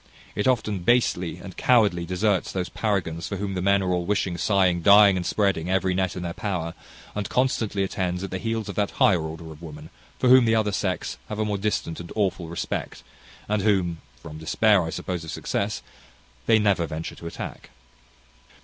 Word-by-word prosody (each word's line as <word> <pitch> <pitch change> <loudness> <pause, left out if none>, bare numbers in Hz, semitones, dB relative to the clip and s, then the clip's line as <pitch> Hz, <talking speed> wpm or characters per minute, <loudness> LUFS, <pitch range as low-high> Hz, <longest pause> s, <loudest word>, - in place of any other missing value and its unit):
It 105 - -1
often 110 -6 +1
basely 90 -4 +1
and 95 - -10
cowardly 105 -9 +3
deserts 95 +1 0
those 90 -2 -3
paragons 90 -6 -2
for 100 - -4
whom 100 0 -3
the 90 - -2
men 100 +1 +3
are 90 - 0
all 90 -1 0
wishing, 100 -2 0
sighing, 90 -2 +2
dying, 100 +2 +7
and 90 - -1
spreading 95 -4 0
every 95 0 +1
net 95 0 -1
in 90 - -5
their 85 -1 -3
power; 85 -5 -3 0.4
and 105 -2 -3
constantly 115 -6 0
attends 90 -1 -2
at 95 - -5
the 95 - -3
heels 115 -1 -2
of 100 - -4
that 105 0 0
higher 90 -5 +4
order 80 +1 -7
of 80 +1 -12
women 75 -1 -10 0.3
for 130 - +1
whom 130 -1 +7
the 115 0 +3
other 110 -2 +1
sex 95 -1 -2
have 105 - -4
a 110 - 0
more 105 -2 -1
distant 95 -5 -2
and 85 -1 -8
awful 95 -5 0
respect, 85 - -4 0.4
and 105 0 0
whom 95 -5 +1 0.2
(from 80 0 -9
despair, 100 +5 +3
I 80 - -3
suppose, 90 +1 -4
of 80 - -8
success) 100 +5 -2 0.6
they 110 - +6
never 100 -6 +2
venture 80 +2 -5
to 85 - -9
attack. - - -7
95 Hz, 195 wpm, -25 LUFS, 85-105 Hz, 0.6 s, dying